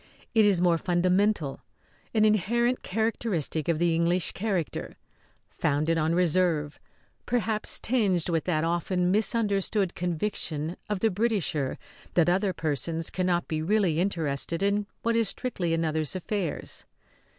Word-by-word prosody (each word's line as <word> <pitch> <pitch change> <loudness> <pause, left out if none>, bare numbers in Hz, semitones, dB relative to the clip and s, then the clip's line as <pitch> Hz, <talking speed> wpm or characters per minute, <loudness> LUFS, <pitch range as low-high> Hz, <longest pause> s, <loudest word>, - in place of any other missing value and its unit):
It 220 -2 +5
is 200 -4 +4
more 170 -2 +3
fundamental, 180 -3 +1 0.5
an 215 -1 +3
inherent 235 +4 +2
characteristic 205 - -1
of 170 -2 +2
the 170 0 +2
English 170 +2 +2
character, 190 -5 -3 0.5
founded 155 +3 0
on 160 +1 +1
reserve 170 -4 +1 0.5
perhaps 225 -3 0
tinged 205 -9 +1
with 165 -3 0
that 155 -3 +1
often 175 +2 0
misunderstood 205 -2 +1
conviction 170 -2 -2
of 205 -3 -2
the 225 - +3
Britisher 185 - -1 0.4
that 175 -1 +4
other 190 +2 +2
persons 160 0 -2
cannot 180 -2 0
be 155 -1 -2
really 180 -2 +2
interested 165 -2 -1
in 200 +1 +1 0.2
what 230 0 +1
is 230 -3 +3
strictly 190 -10 -3
another's 160 -1 0
affairs. 185 -2 -3
180 Hz, 130 wpm, -27 LUFS, 165-210 Hz, 0.5 s, It